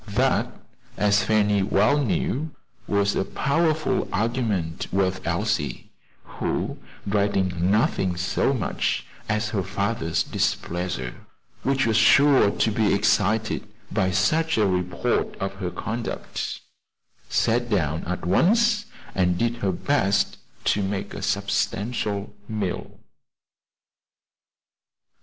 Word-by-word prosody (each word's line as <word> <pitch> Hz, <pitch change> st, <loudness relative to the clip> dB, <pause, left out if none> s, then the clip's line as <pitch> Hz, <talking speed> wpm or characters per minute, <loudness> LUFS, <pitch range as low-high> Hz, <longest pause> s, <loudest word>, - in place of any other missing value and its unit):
That, -, -, +2 dB, 0.5 s
as 105 Hz, 0 st, +3 dB
Fanny 105 Hz, -2 st, +2 dB
well 105 Hz, +8 st, +3 dB
knew, 140 Hz, +5 st, -1 dB, 0.3 s
was 100 Hz, 0 st, +1 dB
a -, -, +1 dB
powerful 155 Hz, -, 0 dB
argument 105 Hz, -6 st, -1 dB
with 95 Hz, -1 st, +1 dB
Elsie, -, -, -1 dB, 0.3 s
who, -, -, -3 dB, 0.3 s
dreading 95 Hz, -3 st, +1 dB
nothing 95 Hz, -3 st, +1 dB
so 90 Hz, 0 st, +1 dB
much -, -, -1 dB, 0.2 s
as 105 Hz, 0 st, 0 dB
her 105 Hz, -3 st, -1 dB
father's 100 Hz, -3 st, -1 dB
displeasure, 85 Hz, -8 st, -2 dB, 0.5 s
which 135 Hz, 0 st, +1 dB
was 110 Hz, -2 st, +2 dB
sure 140 Hz, 0 st, +6 dB
to 110 Hz, -, +1 dB
be 105 Hz, -2 st, +2 dB
excited 110 Hz, +2 st, +1 dB, 0.2 s
by 95 Hz, -4 st, +1 dB
such 155 Hz, -, +2 dB
a 110 Hz, -, +4 dB
report 90 Hz, +5 st, 0 dB
of 95 Hz, -1 st, -3 dB
her 95 Hz, -2 st, -3 dB
conduct, 110 Hz, +6 st, -4 dB, 0.7 s
sat 120 Hz, +1 st, +1 dB
down 80 Hz, -7 st, 0 dB
at 90 Hz, 0 st, -3 dB
once 210 Hz, -, +3 dB, 0.3 s
and 90 Hz, -2 st, +2 dB
did 120 Hz, +4 st, 0 dB
her 100 Hz, -4 st, 0 dB
best 100 Hz, -1 st, +1 dB, 0.3 s
to 105 Hz, -, +2 dB
make 95 Hz, 0 st, -3 dB
a -, -, -6 dB
substantial 105 Hz, -1 st, -1 dB, 0.2 s
meal. 105 Hz, -5 st, -4 dB
105 Hz, 110 wpm, -24 LUFS, 95-115 Hz, 0.7 s, sure